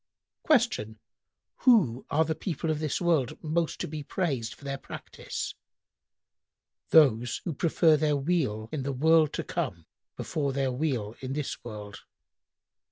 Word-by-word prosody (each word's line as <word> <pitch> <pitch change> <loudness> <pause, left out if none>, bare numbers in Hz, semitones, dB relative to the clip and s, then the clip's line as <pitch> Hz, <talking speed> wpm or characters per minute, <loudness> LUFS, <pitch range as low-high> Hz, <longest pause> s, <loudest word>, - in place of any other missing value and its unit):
Q 230 - +2 0.6
"Who 185 - +3
are 160 +2 +3
the 160 - 0
people 160 -2 -3
of 155 - -1
this 155 -2 -1
world 155 -5 +1
most 165 +1 -1
to - - -2
be 155 0 -5
praised 140 -8 -2
for - - -20
their 135 0 -3
practice?"—"Those 125 -3 -2
who 170 - -2
prefer 160 +1 +3
their 150 -1 +2
weal 135 -8 0
in 150 - -2
the 135 +1 -2
world 160 +3 +4
to - - -2
come 85 -2 -3 0.3
before 140 -3 -2
their 135 -1 0
weal 125 -6 -1
in 130 0 -4
this 145 -1 -4
world." 105 -3 -8
145 Hz, 140 wpm, -28 LUFS, 125-160 Hz, 0.6 s, world